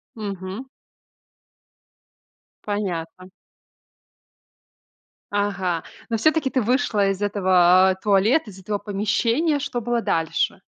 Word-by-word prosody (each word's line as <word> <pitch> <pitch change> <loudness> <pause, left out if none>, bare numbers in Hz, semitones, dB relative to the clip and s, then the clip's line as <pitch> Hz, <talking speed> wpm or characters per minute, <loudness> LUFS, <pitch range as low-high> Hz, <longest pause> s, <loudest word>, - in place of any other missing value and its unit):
Мгм. 200 +1 -6 2.0
Понятно. 185 -3 -4 2.0
Ага, 190 -5 -1 0.3
но 225 - 0
всё-таки 310 +3 +2
ты 260 - 0
вышла 220 -4 +1
из 195 +1 -3
этого, 185 -2 +4
а, 190 - +1
туалета, 210 +7 +2
из 190 - -13
этого 205 +2 -3
помещения. 220 - 0
Что 250 -3 -3
было 240 +1 -1
дальше? 165 -6 -1
205 Hz, 95 wpm, -22 LUFS, 185-230 Hz, 2.0 s, этого